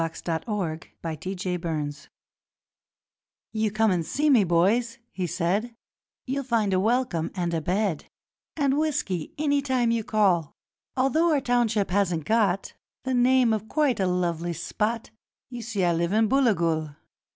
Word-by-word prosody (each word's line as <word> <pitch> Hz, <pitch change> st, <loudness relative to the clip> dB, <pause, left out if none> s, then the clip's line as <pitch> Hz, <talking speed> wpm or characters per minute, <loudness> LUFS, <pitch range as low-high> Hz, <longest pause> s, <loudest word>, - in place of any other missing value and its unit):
Hay 165 Hz, -, +1 dB, 0.2 s
and 165 Hz, -2 st, -1 dB
Hell 210 Hz, -2 st, -1 dB
and 160 Hz, 0 st, -5 dB, 0.2 s
Booligal 165 Hz, -3 st, -4 dB, 1.5 s
'You 220 Hz, -1 st, +1 dB
come 215 Hz, +1 st, +2 dB
and 175 Hz, -2 st, +1 dB
see 295 Hz, -, +1 dB
me, 235 Hz, -6 st, +6 dB
boys,' 195 Hz, +8 st, +2 dB
he 185 Hz, -2 st, -3 dB
said; 185 Hz, +7 st, -1 dB, 0.5 s
'You'll 275 Hz, +2 st, -2 dB
find 225 Hz, -6 st, +1 dB
a 185 Hz, -, +3 dB
welcome 220 Hz, -6 st, 0 dB
and 175 Hz, -2 st, -1 dB
a 165 Hz, -, 0 dB
bed 185 Hz, 0 st, -1 dB, 0.5 s
And 280 Hz, -1 st, +2 dB
whisky 205 Hz, -, -2 dB
any 285 Hz, -1 st, +1 dB
time 255 Hz, -4 st, +1 dB
you 230 Hz, -1 st, 0 dB
call; 190 Hz, -8 st, +1 dB, 0.4 s
Although 310 Hz, +6 st, +3 dB
our 295 Hz, -, +3 dB
township 235 Hz, -6 st, +1 dB
hasn't 180 Hz, -5 st, +1 dB
got 205 Hz, -4 st, +1 dB, 0.3 s
The 260 Hz, 0 st, -1 dB
name 250 Hz, -1 st, +4 dB
of 215 Hz, 0 st, -3 dB
quite 295 Hz, -7 st, +1 dB
a 190 Hz, -, +2 dB
lively 175 Hz, -1 st, -1 dB
spot 215 Hz, +8 st, -2 dB, 0.4 s
You 245 Hz, -1 st, -6 dB
see, 215 Hz, -4 st, -2 dB
I 175 Hz, -1 st, +3 dB
live 170 Hz, +3 st, 0 dB
in 220 Hz, +1 st, +3 dB
Booligal. 170 Hz, -, +1 dB
205 Hz, 150 wpm, -26 LUFS, 170-245 Hz, 1.5 s, me